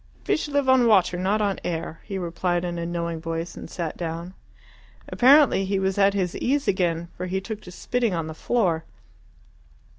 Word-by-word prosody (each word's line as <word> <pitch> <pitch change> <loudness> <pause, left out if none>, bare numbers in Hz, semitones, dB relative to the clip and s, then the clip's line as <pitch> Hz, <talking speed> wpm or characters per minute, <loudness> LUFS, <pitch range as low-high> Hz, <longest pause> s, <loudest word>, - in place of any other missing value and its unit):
"Fish 310 - 0
live 285 -2 0
on 260 -2 +5
water, 190 -5 +4
not 195 +4 +1
on 200 -2 0
air," 165 -1 -4
he 195 -2 -4
replied 175 0 -1
in 175 -1 -3
a 170 - -3
knowing 170 -1 -3
voice, 165 +1 -4
and - - -9
sat 170 -3 -4
down. 170 +1 -5 0.7
Apparently 270 -5 +5
he 195 +1 0
was 190 +1 0
at 200 0 +4
his 180 -3 -1
ease 280 +3 0
again, 170 -3 0
for 180 - -5
he 190 +1 -1
took 210 +2 -6
to 180 - -11
spitting 235 +2 -1
on 165 -1 -2
the 160 - -6
floor. 170 -3 0
185 Hz, 185 wpm, -24 LUFS, 170-210 Hz, 0.7 s, on